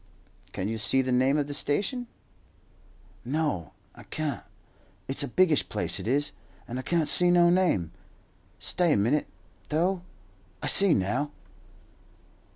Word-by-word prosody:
"Can 95 - -3
you 110 +1 -3
see 130 +6 +1
the 130 - -2
name 130 +3 +3
of 145 - 0
the 145 - -6
station?" 205 - -1 1.2
"No, 130 - -2 0.2
I - - -14
can't. 155 -2 -4 0.7
It's 135 +2 -2
a 140 - -1
biggish 160 +2 +2
place - - -1
it - - -6
is, 140 +4 +1 0.4
and 125 +2 -5
I - - -2
can't 165 +3 0
see 180 0 +3
no 175 -1 +5
name. 170 - +1 0.7
Stay 175 -4 +1
a - - +2
minute, 120 +9 +1 0.4
though. 175 +4 0 0.6
I - - -6
see 195 -4 +6
now." 105 +10 -1
145 Hz, 145 wpm, -27 LUFS, 125-175 Hz, 1.2 s, see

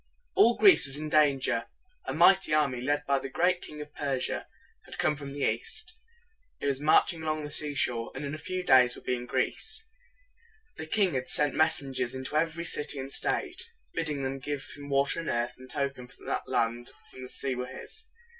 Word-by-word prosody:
All 235 +1 +4
Greece 390 - +7
was 135 +1 +4
in 155 0 -4
danger. 140 -6 +2 0.4
A - - -3
mighty 175 -1 +5
army, 140 -5 +1
led 145 +3 -1
by 140 -1 +1
the 135 - -7
great 180 +6 +1
King 150 0 -9
of 150 0 -10
Persia, 135 -3 -2 0.4
had - - -9
come 150 - +1
from 140 -1 -8
the 140 0 -2
east. 350 - -2 0.7
It - - -5
was 140 -1 0
marching 160 +2 +3
along 155 -1 -2
the 145 - -6
seashore, 135 -6 0
and - - -5
in 140 - -5
a 155 - -6
few 185 +4 -4
days 125 -6 +5
would - - -13
be - - 0
in 125 0 -4
Greece. 440 - -1 0.9
The 160 - -6
great 155 - -20
king 200 -5 +2
had 130 -1 -2
sent 145 -2 +4
mes 155 0 +3
sen 140 -5 -1
gers 125 -1 -1
into 130 +3 -5
every 165 +2 0
city 150 -3 +3
and 135 0 -6
state, 375 -1 +1 0.3
bidding 150 -4 -1
them 135 +1 -3
give 145 0 -4
him 145 0 -10
water 140 +2 +1
and 165 - -4
earth 120 0 -1
in 130 - -12
token 135 -2 -4 0.2
that - - -3
the - - -10
land 120 +1 -1 0.2
and 130 - -10
the 125 - -9
sea 135 0 -1
were 125 0 -4
his. 445 - -7
145 Hz, 210 wpm, -28 LUFS, 130-160 Hz, 0.9 s, Greece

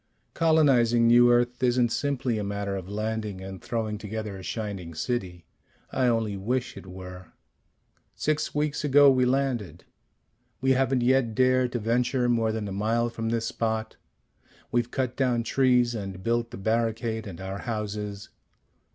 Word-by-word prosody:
Colonizing 135 -8 +4
New 120 +1 +6
Earth 120 +1 +1
isn't 125 -1 +3
simply 130 -5 -1
a - - -2
matter 100 0 -3
of 95 -1 -6
landing 105 -1 -3
and 95 -1 -8
throwing 110 -1 -3
together 105 -1 -5
a 95 - -8
shining 95 -5 -5
city. 90 -4 -3 0.5
I 130 -1 +1
only 115 -3 +1
wish 120 +6 -2
it - - -11
were. 90 -2 -10 0.8
"Six 155 -1 -1
weeks 150 0 -1
ago 145 -1 +6
we 130 -1 +3
landed. 125 - -1 0.7
We 130 +1 +2
haven't 130 -1 +2
yet 125 -3 +2
dared 130 0 +3
to - - 0
venture 120 +3 +1
more 115 -2 +2
than 110 -2 -3
a - - -5
mile 115 +4 0
from 115 -1 -3
this 115 0 -1
spot. 110 -1 -2 0.7
We've 120 0 +1
cut 130 -1 -2
down 125 -3 +1
trees 125 -1 +3
and 95 -4 -6
built 115 0 0
the 120 - -8
barricade 110 +1 -1
and 90 -3 -8
our 95 +1 -5
houses. 105 -2 -4
115 Hz, 155 wpm, -26 LUFS, 105-125 Hz, 0.8 s, New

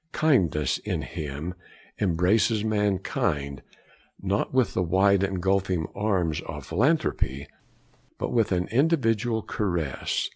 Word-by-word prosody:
Kindness, 85 - +2
in - - -3
him, 75 +3 -5 0.5
embraces 105 +4 +2
mankind, 95 - -1 0.6
not 100 +1 -1
with 130 -3 +2
the - - 0
wide 95 +3 +3
engulfing 95 -2 0
arms 95 -7 0
of - - -6
philanthropy, 120 - 0 0.7
but - - -3
with 115 -3 +2
an 90 -1 +1
individual 115 -5 +1
caress. 85 -9 -2
95 Hz, 105 wpm, -26 LUFS, 85-110 Hz, 0.7 s, wide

